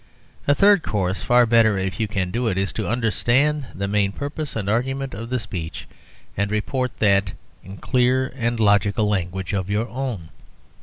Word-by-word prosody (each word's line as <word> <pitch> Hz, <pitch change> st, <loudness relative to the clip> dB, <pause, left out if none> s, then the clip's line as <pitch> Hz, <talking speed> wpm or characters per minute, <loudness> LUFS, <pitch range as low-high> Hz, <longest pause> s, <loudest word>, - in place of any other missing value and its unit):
A 145 Hz, -, +4 dB
third 200 Hz, +3 st, +5 dB
course, 95 Hz, -7 st, -2 dB
far 120 Hz, 0 st, +4 dB
better 115 Hz, -3 st, +4 dB
if 95 Hz, -1 st, -3 dB
you 110 Hz, -, 0 dB
can 95 Hz, -3 st, -2 dB
do 120 Hz, +3 st, -1 dB
it, 95 Hz, -4 st, 0 dB
is 95 Hz, 0 st, -1 dB
to -, -, -3 dB
understand 125 Hz, +5 st, +1 dB
the 100 Hz, +1 st, -2 dB
main 100 Hz, -1 st, +1 dB
purpose 145 Hz, +5 st, -5 dB
and 105 Hz, -3 st, -3 dB
argument 135 Hz, +5 st, -1 dB
of 115 Hz, +4 st, -7 dB
the 125 Hz, -, 0 dB
speech, 85 Hz, -8 st, -6 dB, 0.5 s
and 100 Hz, +1 st, -1 dB
report 125 Hz, +4 st, -2 dB
that 100 Hz, -2 st, +2 dB, 0.3 s
in 95 Hz, +2 st, -10 dB
clear 130 Hz, +2 st, +1 dB
and 120 Hz, -2 st, -1 dB
logical 105 Hz, 0 st, +3 dB
language 95 Hz, -2 st, -2 dB
of 95 Hz, -1 st, -2 dB
your 105 Hz, +3 st, 0 dB
own. 120 Hz, -11 st, -4 dB
110 Hz, 175 wpm, -22 LUFS, 100-125 Hz, 0.5 s, third